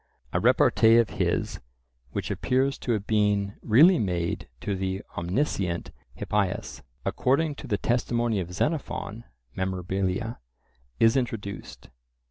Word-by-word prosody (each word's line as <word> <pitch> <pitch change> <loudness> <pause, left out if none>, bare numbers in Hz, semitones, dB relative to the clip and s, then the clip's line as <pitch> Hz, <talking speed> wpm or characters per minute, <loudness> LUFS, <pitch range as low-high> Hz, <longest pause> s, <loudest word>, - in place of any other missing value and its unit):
A - - +2
repartee 115 +1 +5
of 115 -3 +3
his - - 0 0.5
which - - -3
appears 135 +2 0
to 120 - -1
have 105 -2 -2
been 105 -2 +1
really 150 - +6
made 90 -5 -1
to 100 - -2
the 95 +1 -3
"omniscient" 90 -2 -1 0.2
Hippias, 100 -1 -2 0.2
according 145 +4 +1
to 145 - -8
the 105 -4 0
testimony 120 -2 0
of 90 -1 -4
Xenophon 115 - -2 0.3
(Mem.), 95 - -2 0.6
is 115 +2 +5
introduced. 115 -6 -4
105 Hz, 115 wpm, -26 LUFS, 95-120 Hz, 0.6 s, really